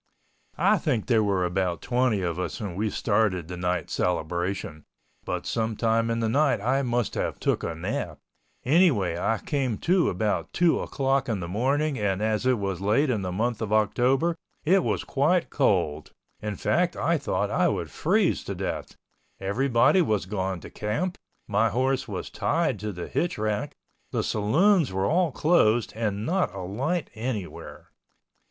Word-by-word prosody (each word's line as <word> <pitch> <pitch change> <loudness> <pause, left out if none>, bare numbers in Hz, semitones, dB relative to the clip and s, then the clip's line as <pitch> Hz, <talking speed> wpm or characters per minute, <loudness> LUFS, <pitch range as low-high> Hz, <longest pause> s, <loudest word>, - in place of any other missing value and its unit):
I - - +3
think 110 -4 0
there 115 -3 +3
were 95 -3 +1
about 90 -1 -1
twenty 125 -5 +1
of 85 0 -2
us 90 - -3
when 100 -5 -4
we 105 +3 0
started 100 -6 0
the 90 - -6
night 90 -2 -2
celebration, 85 -2 -2 0.4
but - - -3
sometime 115 0 0
in 115 0 0
the 115 - +1
night 140 +3 +2
I 130 +6 +1
must 120 -3 -1
have - - -2
took - - 0
a 85 - -3
nap, 80 - -3 0.5
anyway 125 - +3
I 115 +5 +1
came 130 -4 -2
to 180 - +2
about 90 -3 -1
two 175 -2 +3
o'clock 135 -1 0
in 110 -4 -1
the 85 - -4
morning 135 - 0
and 100 -2 0
as 110 +3 0
it 130 -1 +3
was 95 -3 -3
late 115 +8 +2
in 110 -5 -1
the 90 -1 -3
month 115 +4 -1
of 110 -2 -3
October 125 +10 +2 0.3
it 185 +3 +4
was - - -1
quite 160 +6 +1
cold, 85 - +1 0.3
in 105 -1 -3
fact - - +1
I - - +1
thought - - -1
I - - +3
would - - -2
freeze - - +1
to - - -4
death, - - -4 0.4
everybody 120 - +3
was 110 - 0
gone 95 -2 -3
to - - -10
camp, 150 +13 -2 0.3
my 110 +2 +2
horse 130 +4 0
was - - -5
tied 160 - 0
to 105 +1 -3
the 90 -2 -6
hitch 175 - -1
rack, 110 +7 -2 0.3
the - - -1
saloons 155 - +3
were 95 +1 0
all 170 - +2
closed, 120 -7 +2
and 105 -2 -2
not 185 +6 +1
a 95 - -5
light 135 - -2
anywhere. 110 -5 -6
110 Hz, 170 wpm, -26 LUFS, 95-135 Hz, 0.5 s, it